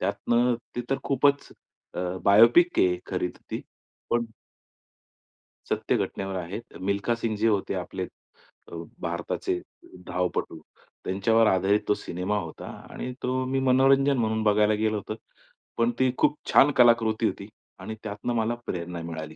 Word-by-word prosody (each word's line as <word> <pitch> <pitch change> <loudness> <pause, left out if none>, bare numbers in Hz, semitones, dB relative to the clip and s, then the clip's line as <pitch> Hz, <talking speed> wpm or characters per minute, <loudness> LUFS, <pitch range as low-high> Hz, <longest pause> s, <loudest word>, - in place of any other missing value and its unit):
त्यातनं 120 +1 +1 0.2
ती - - 0
तर 135 - +1
खूपच, 140 +1 +2 0.5
अ, - - -3 0.2
बायोपिक 115 - +6
आहे 90 -1 +3
खरी 90 -1 -1
तर - - -15
ती, - - -3 0.5
पण 120 0 +2 1.4
सत्य - - 0
घटनेवर 95 -1 -3
आहेत, 90 +6 -5 0.2
मिल्खा 100 +4 0
सिंह 115 -2 -2
जे 110 +2 +1
होते 100 -2 0
आपले, 95 0 -4 0.7
अ, - - -7 0.3
भारताचे 85 0 -2 0.5
धावपटू, 90 -2 -2 0.5
त्यांच्यावर 110 +4 +3
आधारित 95 +2 +3
तो - - +4
सिनेमा 95 +2 -3
होता 85 -4 -8 0.2
आणि 125 - -5
तो 130 +1 0
मी 135 +1 0
मनोरंजन 135 +1 +4
म्हणून 110 -1 0
बघायला 105 0 +4
गेलो 110 0 0
होतो. 110 +1 -5 0.6
पण 115 +1 +2
ती 130 -1 +3
खूप 150 0 +2
छान 145 - +6
कलाकृती 115 -3 +4
होती - - -5 0.3
आणि 110 - -6
त्यातनं 105 +2 -3
मला 115 +1 0
प्रेरणा 85 -1 -4
मिळाली 80 -2 -6
110 Hz, 145 wpm, -26 LUFS, 95-120 Hz, 1.4 s, बायोपिक